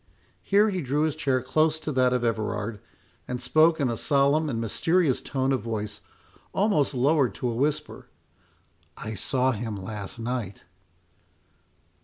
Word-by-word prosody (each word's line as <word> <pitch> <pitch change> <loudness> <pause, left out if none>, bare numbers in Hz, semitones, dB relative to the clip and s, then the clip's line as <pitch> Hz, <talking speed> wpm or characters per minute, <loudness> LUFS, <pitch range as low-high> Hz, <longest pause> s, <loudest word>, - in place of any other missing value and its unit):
—Here 205 +2 +3
he 185 -2 -2
drew 145 +2 0
his 155 -2 0
chair 130 -3 0
close 155 +4 +2
to 155 -1 -5
that 130 -2 +3
of 125 -1 0
Everard, 110 -1 -2 0.5
and 125 0 -3
spoke 155 +6 +3
in 140 - +2
a 120 - -1
solemn 145 +4 +2
and 115 -4 -2
mysterious 150 - +1
tone 135 0 -1
of 130 - +1
voice, 105 -2 -4 0.5
almost 175 -9 +1
lowered 130 -4 +2
to 125 - -2
a 115 - -3
whisper—"I 135 -4 -6
saw 130 +4 +1
him 110 -2 -4
last 100 +1 -6
night." 115 -4 -4
130 Hz, 145 wpm, -26 LUFS, 115-150 Hz, 0.5 s, Here